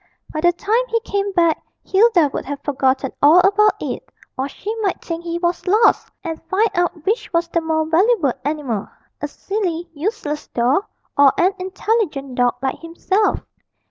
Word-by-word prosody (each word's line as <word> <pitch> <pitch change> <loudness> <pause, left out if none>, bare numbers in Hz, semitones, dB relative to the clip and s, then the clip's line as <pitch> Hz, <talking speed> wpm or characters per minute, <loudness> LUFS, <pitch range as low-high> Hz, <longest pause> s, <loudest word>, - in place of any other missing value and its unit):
By 310 - -2
the 350 +1 +5
time 425 +7 +1
he 460 -1 +1
came 400 -2 -2
back 335 -3 +2 0.2
Hilda 380 -7 +4
would - - -3
have 285 0 -4
forgotten 265 -1 0
all 300 +4 +7
about 410 +3 +4
it, - - -4 0.3
or 265 +2 -2
she 420 +8 -5
might 390 -4 0
think 335 0 -5
he 340 0 -3
was 345 +1 -2
lost, 425 +5 +3
and 325 -3 -5
find 425 +4 +2
out 350 -3 -1
which 430 +5 -1
was 335 -1 +1
the 335 - 0
more 320 -1 0
valuable 335 - +3
animal 275 -8 -2 0.3
a 295 - -1
silly, 350 0 -3
useless 310 -2 -3
doll, 255 - +1 0.3
or 280 -1 +6
an 370 +3 +3
intelligent 370 - -1
dog 245 -1 +2
like 265 - -1
himself. 360 +5 0
340 Hz, 170 wpm, -20 LUFS, 295-395 Hz, 0.3 s, all